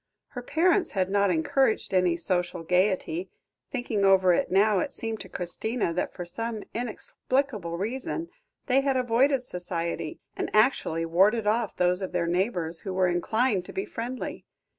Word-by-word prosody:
Her 245 - -6
parents 345 +9 +2
had 190 -2 0
not 200 0 +3
encouraged 200 +8 +1
any 180 -2 +3
social 175 0 -1
gaiety; 180 0 +1 0.4
thinking 245 -6 -2
over 190 -2 +5
it - - +1
now, 200 +1 +4
it - - -2
seemed 225 -1 -4
to 190 - -9
Christina 180 +3 -2
that 180 - -1
for 175 - -7
some 225 +4 -4
inexplicable 235 -4 -2
reason 260 - -3 0.4
they 265 +1 +3
had 270 -1 +1
avoided 255 +2 +2
society, 170 -6 -4 0.2
and - - -3
actually 215 -8 +2
warded 200 +7 +3
off 220 0 +1
those 180 +1 +2
of 190 - -4
their 175 -1 +1
neighbours 175 -2 -1
who 190 -2 -5
were 185 -1 +3
inclined 205 +4 +1
to - - -10
be 385 +1 -2
friendly. 250 - -5
200 Hz, 160 wpm, -27 LUFS, 180-245 Hz, 0.4 s, over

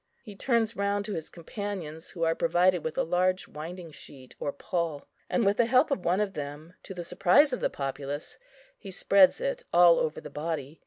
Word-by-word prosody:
He 210 -5 -10
turns 230 0 +1
round 200 0 -1
to 210 - -4
his 160 -3 -5
companions 175 -3 -6
who 170 - -4
are 165 0 +3
provided 180 -6 +2
with 160 - -4
a - - +2
large 185 +2 +1
winding 165 +2 -8
sheet 130 -3 -12
or 145 - -2
pall, 165 -2 -3 0.2
and 235 - +1
with 200 +1 +2
the 235 - +3
help 255 +5 +4
of 205 -10 -1
one 180 +3 +2
of 205 -2 -1
them, 150 +3 -7
to 190 - -9
the 175 - -5
surprise 225 - +4
of 250 - -1
the - - 0
populace, 140 +1 -5 0.4
he 200 - -10
spreads 195 - +4
it - - -2
all 175 -1 +6
over 155 - -1
the - - -10
body. 155 -1 -4
180 Hz, 205 wpm, -28 LUFS, 160-205 Hz, 0.4 s, all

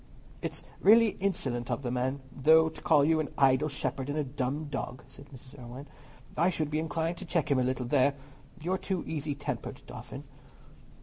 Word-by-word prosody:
"It - - -3
is - - -10 0.2
really 225 +2 +7
insolent 135 -11 -1
of 140 - -2
the 120 - -2
man, 130 +2 -1
though, 160 +3 +5
to 160 - -12
call 150 -3 +4
you 160 +1 +3
an 155 - -1
'idle 135 +2 +4
shepherd' 135 -1 -3
and 145 - -2
a 150 - +1
'dumb 140 +2 -3
dog,'" 135 -3 -5
said 140 +1 -13
Mrs. 135 0 -13
Irwine. 125 +4 -9 0.5
"I 170 +3 +3
should 155 -4 -2
be 155 - +1
inclined 165 +1 -2
to 190 - -7
check 160 -4 0
him 135 - +4
a - - +2
little 130 0 -1
there. 140 +2 +3 0.5
You 175 - -1
are 190 - 0
too 190 -3 -2
easy 150 -2 -3
tempered, 145 - -5
Dauphin." - - -8
145 Hz, 200 wpm, -30 LUFS, 130-160 Hz, 0.5 s, really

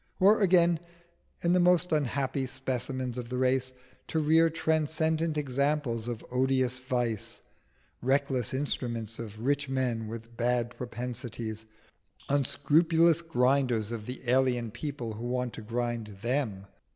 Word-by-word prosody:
or 205 +4 +6
again, 175 -3 +5 0.6
in 170 +1 +3
the 180 - +4
most 180 0 +4
unhappy 135 -2 0
specimens 130 -1 -3
of 120 -1 -6
the 125 - -2
race, 130 0 +1 0.4
to - - -2
rear 160 +2 +5
transcendent 160 0 0
examples 140 -4 0
of 120 -2 -5
odious 130 0 +1
vice, 120 -3 -2 0.6
reckless 135 -2 +1
instruments 120 -5 -3
of 110 0 -7
rich 140 0 +1
men 125 -4 -1
with 115 +1 -8
bad 120 0 0
propensities, 120 -2 -5 0.6
unscrupulous 160 +4 +3
grinders 125 -7 +1
of 110 -2 -5
the 125 +1 -5
alien 125 -2 +2
people 130 -4 -5
who 115 +3 -6
wanted 125 -1 -1
to - - -7
grind 120 0 -2 0.2
them? 120 -6 -1
130 Hz, 125 wpm, -29 LUFS, 120-145 Hz, 0.6 s, or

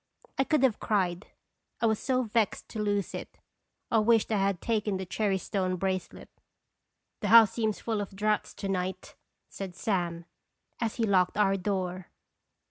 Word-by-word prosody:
I 270 - +3
could 305 -2 +2
have 250 -5 +3
cried, 185 -2 0 0.5
I - - +1
was 220 -2 +2
so 255 -1 +1
vexed 220 -2 0
to 220 - -4
lose 205 -2 -1
it. - - -7 0.5
I 225 - +4
wished 225 0 +3
I 215 - +2
had 195 -2 +1
taken 210 -3 0
the 190 - -5
cherry 195 +1 0
stone 185 -1 -1
bracelet. 185 0 -3 0.5
" - - -54
The 205 - -1
house 225 -1 +8
seems 220 -3 -1
full 220 -3 -1
of 195 -1 -7
draughts 210 +1 0
to 200 - -5
night," 185 -1 -3 0.3
said 190 -3 -7
Sam, 175 -5 -2 0.5
as 225 -2 -1
he 230 - -1
locked 185 -3 +2
our 195 -2 +3
door. 185 -2 -2
205 Hz, 170 wpm, -29 LUFS, 185-220 Hz, 0.5 s, house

